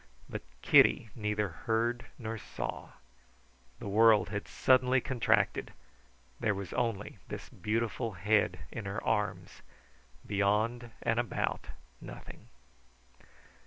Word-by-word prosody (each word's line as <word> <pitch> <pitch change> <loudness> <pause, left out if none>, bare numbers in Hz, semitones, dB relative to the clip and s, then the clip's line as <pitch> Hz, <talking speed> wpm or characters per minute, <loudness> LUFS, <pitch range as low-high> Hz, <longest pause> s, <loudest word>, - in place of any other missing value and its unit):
But - - -5 0.2
Kitty 80 - +5
neither 105 -2 -1
heard 115 +7 -1
nor 115 -1 -4
saw. - - -5 0.9
The - - -7
world 110 0 +5
had 105 0 -4
suddenly 130 0 +4
contracted; 125 -2 +1 0.7
there 105 -2 +1
was 100 -2 -6
only 115 -4 -2
this - - -7
beautiful 115 +3 -2
head 105 +4 +2
in 110 - -6
her 100 +2 -4
arms; 105 -2 -1 0.6
beyond 105 +4 +1
and 115 - +2
about, 120 - -2 0.3
nothing. - - -11
110 Hz, 105 wpm, -31 LUFS, 105-115 Hz, 0.9 s, Kitty